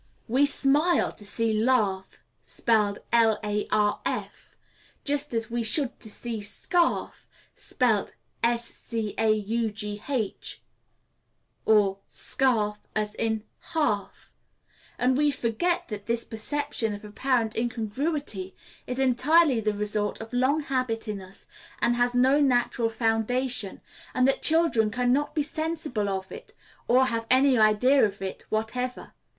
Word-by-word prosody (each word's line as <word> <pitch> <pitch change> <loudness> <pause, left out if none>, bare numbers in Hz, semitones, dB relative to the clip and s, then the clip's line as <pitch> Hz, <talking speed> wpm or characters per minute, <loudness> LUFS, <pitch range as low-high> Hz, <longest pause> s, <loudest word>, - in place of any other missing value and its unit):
We 265 +5 +3
smile 295 +5 +3
to - - -14
see 225 +2 -1
laugh 215 -4 0 0.2
spelled 210 -3 +1 0.2
larf, 210 -2 0 0.5
just 290 0 0
as 230 0 -2
we 240 0 -1
should 245 +4 +1
to 220 - -3
see 225 +1 -3
scarf 335 - -1 0.3
spelled 230 -6 0 0.3
scaugh, 220 -1 -2 1.1
or 200 -3 +4
scalf, 215 -6 0 0.2
as 210 -1 -1
in 220 -1 -1 0.2
half; 210 - -2 0.6
and 255 +1 +2
we 295 +2 +3
forget 280 +7 -1
that 205 -2 -7
this 235 0 -1
perception 225 -1 -2
of 205 +1 -11
apparent 230 +1 0
incongruity 235 - -3 0.3
is 250 - -3
entirely 270 +2 +4
the 215 0 +1
result 210 0 -1
of 225 +2 -9
long 260 +5 +2
habit 255 -5 -2
in 205 -2 -4
us, 190 +1 -10 0.3
and 240 - +2
has 245 0 +1
no 260 +3 +4
natural 245 -4 +2
foundation, 225 0 0 0.3
and 255 0 +4
that 270 - +1
children 315 -9 +3
can 245 +3 +1
not 290 +3 -1
be 300 - +1
sensible 310 -9 -3
of 190 -1 -4
it, - - -11 0.3
or 255 +2 +5
have 230 -2 -2
any 260 +1 +5
idea 220 +6 +4
of 200 -1 0
it 190 - -6
whatever. 250 +4 -3
230 Hz, 125 wpm, -26 LUFS, 215-265 Hz, 1.1 s, or